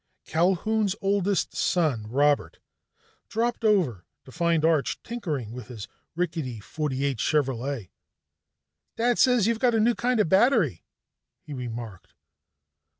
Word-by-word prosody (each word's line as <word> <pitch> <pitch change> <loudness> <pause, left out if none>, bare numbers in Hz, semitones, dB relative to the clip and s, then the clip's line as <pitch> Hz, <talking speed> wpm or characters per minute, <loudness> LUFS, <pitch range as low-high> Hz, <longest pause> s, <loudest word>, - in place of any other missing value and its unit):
Culquhoun's 195 +5 +1
oldest 200 -1 0
son 145 -12 0
Robert 145 +4 +1 0.7
dropped 235 +1 -1
over 175 - +1 0.2
to 130 - -13
find 165 0 +1
Arch 160 -4 +1
tinkering 155 - -4
with 120 -2 -8
his 110 -4 -8 0.3
rickety 160 -9 -3
'48 140 +1 -2
Chevrolet. 135 - -1 1.1
"Dad 240 +1 +1
says 250 -6 +4
you've 230 0 +1
got 240 -1 +3
a - - +3
new 235 +3 +4
kind 245 0 0
of 210 - +3
battery," 190 - +3 0.6
he 150 - -9
remarked. 115 -7 -7
160 Hz, 120 wpm, -26 LUFS, 130-215 Hz, 1.1 s, says